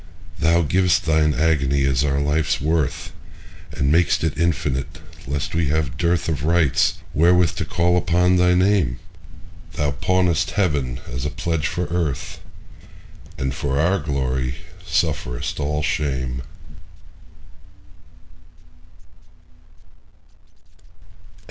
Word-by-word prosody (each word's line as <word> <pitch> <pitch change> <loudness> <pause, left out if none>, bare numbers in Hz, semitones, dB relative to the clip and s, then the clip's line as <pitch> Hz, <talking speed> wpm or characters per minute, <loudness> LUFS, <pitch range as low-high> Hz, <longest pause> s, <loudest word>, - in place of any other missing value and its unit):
Thou 85 +1 +3
giv'st 90 +1 +2
Thine 80 -1 +2
agony 70 -3 +1
as 65 0 +1
our 70 -1 0
life's 75 +2 0
worth, 80 0 -1 0.6
And 70 -1 0
mak'st 85 0 +2
it 80 -2 0
infinite, 75 -3 -1 0.3
lest 70 +3 -3
we 80 -1 +1
have 70 -3 -1
dearthOf 85 -1 0
rights 80 0 +2 0.2
wherewith 85 +1 +4
to - - -2
call 90 +1 +1
upon 90 +2 +2
thy 90 0 +4
Name; 90 -9 +2 0.8
Thou 75 -1 0
pawnest 90 +3 +1
Heaven 70 -10 0
as 65 0 -5
a 75 - -1
pledge 80 -2 -2
for 90 +6 -2
Earth, 85 -6 -2 1.0
And 65 0 -2
for 70 +1 -2
our 90 +5 +2
glory 65 -4 -2 0.3
sufferest - - -2
all 75 +1 -1
shame. 65 -5 -2
75 Hz, 105 wpm, -21 LUFS, 70-85 Hz, 1.0 s, wherewith